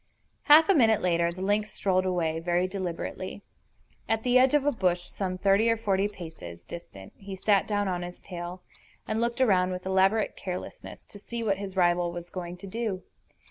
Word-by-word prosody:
Half 310 Hz, +2 st, +8 dB
a 395 Hz, -, +5 dB
minute 225 Hz, -, +4 dB
later 170 Hz, -1 st, +2 dB
the 185 Hz, +2 st, -6 dB
lynx 210 Hz, +2 st, 0 dB
strolled 185 Hz, -1 st, +1 dB
away, 165 Hz, -3 st, 0 dB
very 175 Hz, +2 st, +1 dB
deliberately. 185 Hz, +1 st, -5 dB, 0.7 s
At 225 Hz, 0 st, +1 dB
the 250 Hz, 0 st, +4 dB
edge 260 Hz, +3 st, +4 dB
of 285 Hz, -2 st, +2 dB
a 290 Hz, -, +4 dB
bush 180 Hz, -7 st, 0 dB
some 185 Hz, -2 st, -4 dB
thirty 200 Hz, +4 st, +3 dB
or 230 Hz, -, +2 dB
forty 200 Hz, -2 st, +1 dB
paces 160 Hz, -, -10 dB
distant 100 Hz, -, -10 dB
he 195 Hz, -1 st, -8 dB
sat 195 Hz, +1 st, +2 dB
down 205 Hz, -1 st, 0 dB
on 180 Hz, -1 st, -2 dB
his 175 Hz, 0 st, -7 dB
tail, 175 Hz, 0 st, -7 dB, 0.4 s
and 220 Hz, +1 st, -1 dB
looked 235 Hz, +2 st, -1 dB
around 185 Hz, -7 st, +4 dB
with 185 Hz, 0 st, -5 dB
elaborate 190 Hz, +3 st, +2 dB
carelessness 185 Hz, -1 st, -7 dB
to 205 Hz, -, -14 dB
see 235 Hz, +3 st, -5 dB
what 200 Hz, -3 st, 0 dB
his 195 Hz, -1 st, -6 dB
rival 175 Hz, -1 st, +2 dB
was 175 Hz, 0 st, -8 dB
going 180 Hz, -1 st, -6 dB
to 185 Hz, -, -11 dB
do. 200 Hz, -2 st, -3 dB
190 Hz, 190 wpm, -27 LUFS, 175-215 Hz, 0.7 s, Half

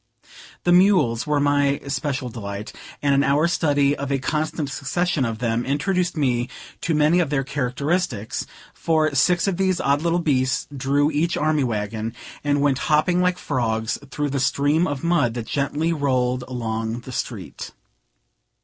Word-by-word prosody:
The 175 Hz, -, +2 dB
mules 175 Hz, -, +4 dB
were 150 Hz, -1 st, +2 dB
my 145 Hz, -1 st, +2 dB
especial 135 Hz, -2 st, -2 dB
delight; 100 Hz, -2 st, -6 dB, 0.3 s
and 140 Hz, -1 st, +3 dB
an 140 Hz, 0 st, +3 dB
hour's 150 Hz, +5 st, +2 dB
study 145 Hz, -2 st, +2 dB
of 140 Hz, -1 st, -4 dB
a 140 Hz, -, +2 dB
constant 155 Hz, +1 st, -2 dB
succession 150 Hz, 0 st, -1 dB
of 115 Hz, -1 st, -3 dB
them 115 Hz, 0 st, -1 dB
introduced 175 Hz, +6 st, 0 dB
me 125 Hz, -4 st, +1 dB, 0.3 s
to 165 Hz, -, 0 dB
many 155 Hz, +4 st, +4 dB
of 170 Hz, -5 st, +1 dB
their 140 Hz, -2 st, 0 dB
characteristics; 135 Hz, -, -2 dB, 0.3 s
for 155 Hz, -2 st, +1 dB
six 175 Hz, +5 st, +3 dB
of 190 Hz, -3 st, 0 dB
these 190 Hz, -1 st, +1 dB
odd 140 Hz, +1 st, +1 dB
little 170 Hz, +1 st, +1 dB
beasts 130 Hz, -7 st, +1 dB
drew 140 Hz, +3 st, +1 dB
each 160 Hz, +3 st, 0 dB
army 155 Hz, -1 st, +1 dB
wagon, 110 Hz, -1 st, -3 dB, 0.3 s
and 145 Hz, -1 st, +1 dB
went 140 Hz, -2 st, +2 dB
hopping 175 Hz, +4 st, +3 dB
like 180 Hz, 0 st, +2 dB
frogs 115 Hz, -8 st, -1 dB
through 145 Hz, +1 st, -2 dB
the 140 Hz, -, -1 dB
stream 145 Hz, +5 st, +2 dB
of 145 Hz, -3 st, -4 dB
mud 165 Hz, -9 st, +2 dB
that 120 Hz, -2 st, -4 dB
gently 145 Hz, +6 st, -1 dB
rolled 130 Hz, -4 st, 0 dB
along 115 Hz, -1 st, -3 dB
the 130 Hz, -, -9 dB
street. -, -, -5 dB
140 Hz, 160 wpm, -22 LUFS, 125-155 Hz, 0.3 s, mules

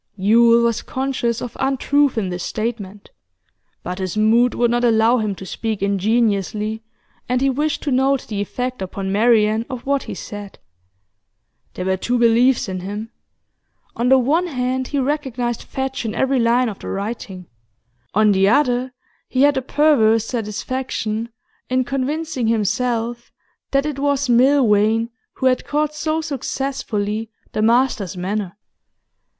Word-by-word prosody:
Yule 230 Hz, +4 st, +4 dB
was 235 Hz, -1 st, +1 dB
conscious 260 Hz, -3 st, -2 dB
of 245 Hz, -, -7 dB
untruth 275 Hz, 0 st, +1 dB
in 200 Hz, -4 st, -1 dB
this 180 Hz, 0 st, -4 dB
statement, 210 Hz, -3 st, -5 dB, 0.7 s
but 180 Hz, +2 st, -5 dB
his 185 Hz, +1 st, -3 dB
mood 230 Hz, +3 st, +3 dB
would 240 Hz, -1 st, +2 dB
not 240 Hz, 0 st, +1 dB
allow 230 Hz, +1 st, +4 dB
him 210 Hz, -2 st, -2 dB
to 190 Hz, -, -9 dB
speak 220 Hz, +1 st, -3 dB
ingenuously, 210 Hz, +1 st, 0 dB, 0.5 s
and 250 Hz, 0 st, +2 dB
he 270 Hz, +1 st, +2 dB
wished 295 Hz, +3 st, -1 dB
to 290 Hz, -, -1 dB
note 265 Hz, +1 st, +2 dB
the 205 Hz, -2 st, -3 dB
effect 250 Hz, +3 st, -4 dB
upon 190 Hz, +1 st, -4 dB
Marian 220 Hz, 0 st, +3 dB
of 255 Hz, -3 st, -6 dB
what 280 Hz, 0 st, +1 dB
he -, -, -7 dB
said. 205 Hz, -1 st, -8 dB, 1.2 s
There 185 Hz, -, -4 dB
were 190 Hz, 0 st, +1 dB
two 245 Hz, +6 st, -1 dB
beliefs 235 Hz, +2 st, +3 dB
in 185 Hz, -1 st, -4 dB
him: 205 Hz, +5 st, -6 dB, 0.8 s
on 240 Hz, +2 st, 0 dB
the 265 Hz, -, +7 dB
one 305 Hz, +8 st, +2 dB
hand, 255 Hz, -3 st, -2 dB
he 290 Hz, -, -3 dB
recognised 260 Hz, -4 st, -1 dB
Fadge 265 Hz, -1 st, -4 dB
in 220 Hz, -1 st, -3 dB
every 265 Hz, 0 st, +1 dB
line 240 Hz, +2 st, +3 dB
of 210 Hz, -3 st, -6 dB
the -, -, -9 dB
writing; 195 Hz, -2 st, -5 dB, 0.7 s
on 215 Hz, 0 st, +5 dB
the 195 Hz, 0 st, +3 dB
other, 250 Hz, -1 st, +2 dB, 0.4 s
he 260 Hz, +1 st, +2 dB
had 290 Hz, 0 st, +4 dB
a 265 Hz, -, 0 dB
perverse 250 Hz, -6 st, +3 dB
satisfaction 225 Hz, 0 st, -3 dB, 0.4 s
in 255 Hz, 0 st, +2 dB
convincing 275 Hz, 0 st, -2 dB
himself 230 Hz, +2 st, -1 dB, 0.4 s
that 275 Hz, +1 st, +1 dB
it 295 Hz, -2 st, -3 dB
was 285 Hz, -1 st, +1 dB
Milvain 230 Hz, -3 st, +3 dB, 0.2 s
who 260 Hz, -, -4 dB
had 255 Hz, -1 st, +3 dB
caught 300 Hz, 0 st, -1 dB
so 310 Hz, +1 st, -1 dB
successfully 235 Hz, -7 st, -3 dB, 0.2 s
the -, -, -2 dB
master's 225 Hz, -5 st, +2 dB
manner. 195 Hz, +1 st, -3 dB
235 Hz, 150 wpm, -20 LUFS, 215-265 Hz, 1.2 s, the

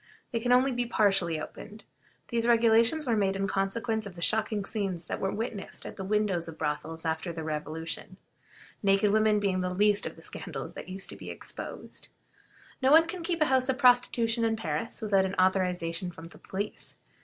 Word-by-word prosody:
They 230 Hz, -, 0 dB
can 245 Hz, +2 st, 0 dB
only 255 Hz, +2 st, +5 dB
be 245 Hz, -1 st, -1 dB
partially 195 Hz, -8 st, +2 dB
opened. 210 Hz, +7 st, -9 dB, 0.5 s
These 235 Hz, -1 st, 0 dB
regulations 230 Hz, +5 st, +4 dB
were 235 Hz, -3 st, +2 dB
made 195 Hz, -2 st, +1 dB
in 195 Hz, 0 st, -1 dB
consequence 220 Hz, +3 st, -1 dB
of 185 Hz, -, -10 dB
the 170 Hz, -, -9 dB
shocking 215 Hz, -1 st, +2 dB
scenes 195 Hz, -6 st, -3 dB
that -, -, -4 dB
were 195 Hz, -, 0 dB
witnessed 220 Hz, -2 st, -5 dB
at -, -, -7 dB
the 190 Hz, -, -6 dB
windows 195 Hz, -4 st, +1 dB
of 165 Hz, -, -8 dB
brothels 160 Hz, +2 st, -3 dB
after 160 Hz, +2 st, -1 dB
the 165 Hz, -1 st, -5 dB
Revolution, 155 Hz, +1 st, -5 dB, 0.6 s
naked 195 Hz, 0 st, +3 dB
women 215 Hz, 0 st, +4 dB
being 190 Hz, -2 st, 0 dB
the 180 Hz, -, -1 dB
least 205 Hz, +2 st, +2 dB
of -, -, -7 dB
the 165 Hz, -, -15 dB
scandals 145 Hz, -7 st, -6 dB
that -, -, -8 dB
used 190 Hz, +1 st, -3 dB
to -, -, -8 dB
be -, -, -9 dB
exposed. -, -, -8 dB, 0.7 s
No 260 Hz, -, +4 dB
one 320 Hz, +3 st, +8 dB
can 345 Hz, +2 st, -6 dB
keep 335 Hz, -1 st, -2 dB
a -, -, +6 dB
house 260 Hz, -1 st, +3 dB
of 260 Hz, -, +1 dB
prostitution 245 Hz, -3 st, +3 dB
in 225 Hz, -1 st, +2 dB
Paris 165 Hz, +1 st, -3 dB
without 200 Hz, -3 st, +3 dB
an 190 Hz, +1 st, -2 dB
authorization 180 Hz, -2 st, +1 dB
from 165 Hz, -1 st, -10 dB
the -, -, -15 dB
police. 200 Hz, +2 st, -5 dB
200 Hz, 195 wpm, -29 LUFS, 180-230 Hz, 0.7 s, one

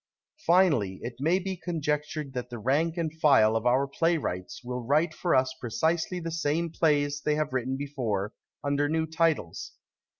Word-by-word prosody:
Finally, 150 Hz, -, +3 dB
it 120 Hz, -, -4 dB
may 165 Hz, +6 st, +3 dB
be 190 Hz, 0 st, -3 dB
conjec 155 Hz, -4 st, -1 dB
tured 150 Hz, -4 st, -5 dB
that 125 Hz, -1 st, -4 dB
the 120 Hz, -, -6 dB
rank 150 Hz, -, +1 dB
and 165 Hz, -2 st, -1 dB
file 110 Hz, -7 st, +5 dB
of 115 Hz, +2 st, 0 dB
our 130 Hz, +3 st, +3 dB
playwrights 140 Hz, -, -1 dB
will 125 Hz, 0 st, -4 dB
^\Tite 155 Hz, +6 st, +2 dB
for 175 Hz, +2 st, +1 dB
us 130 Hz, 0 st, +2 dB
precisely 160 Hz, +9 st, -1 dB
the 165 Hz, -1 st, -4 dB
same 160 Hz, +1 st, -1 dB
plays 145 Hz, -3 st, +1 dB
they 150 Hz, -, +1 dB
have 150 Hz, -2 st, -1 dB
written 130 Hz, +1 st, -1 dB
before, 120 Hz, -8 st, -2 dB, 0.3 s
under 145 Hz, 0 st, +1 dB
new 160 Hz, +1 st, +1 dB
titles. 160 Hz, -, -1 dB
145 Hz, 170 wpm, -28 LUFS, 125-165 Hz, 0.3 s, file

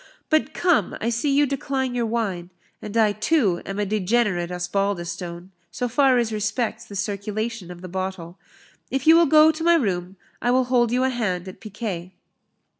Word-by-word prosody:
But, 310 Hz, 0 st, +2 dB
come, 350 Hz, -3 st, +1 dB
I 230 Hz, -, -1 dB
see 235 Hz, +5 st, 0 dB
you 285 Hz, +1 st, +4 dB
decline 270 Hz, -2 st, -2 dB
your 240 Hz, -2 st, 0 dB
wine 200 Hz, -7 st, -2 dB, 0.3 s
and 210 Hz, +2 st, -5 dB
I 220 Hz, -2 st, +4 dB
too 215 Hz, -, +1 dB
am 195 Hz, -, -4 dB
a 205 Hz, -, 0 dB
degenerate 200 Hz, -3 st, 0 dB
Osbaldistone, 175 Hz, -1 st, -3 dB, 0.2 s
so 250 Hz, -, -3 dB
far 260 Hz, +1 st, +3 dB
as 230 Hz, -2 st, 0 dB
respects 220 Hz, +2 st, -2 dB
the 200 Hz, -, -10 dB
circulation 205 Hz, 0 st, -3 dB
of 175 Hz, -1 st, -10 dB
the -, -, -6 dB
bottle. 185 Hz, -1 st, -5 dB, 0.5 s
If 270 Hz, 0 st, -2 dB
you 320 Hz, +1 st, +8 dB
will 335 Hz, -1 st, +5 dB
go 310 Hz, +2 st, +7 dB
to 320 Hz, +1 st, -6 dB
my 340 Hz, 0 st, +5 dB
room, 190 Hz, -, -1 dB, 0.3 s
I 245 Hz, -, 0 dB
will 255 Hz, +1 st, +4 dB
hold 245 Hz, -2 st, +2 dB
you 250 Hz, +1 st, +2 dB
a 260 Hz, -, +2 dB
hand 190 Hz, -8 st, -2 dB
at 185 Hz, -, -10 dB
piquet." 195 Hz, -4 st, -6 dB
215 Hz, 185 wpm, -23 LUFS, 185-250 Hz, 0.5 s, you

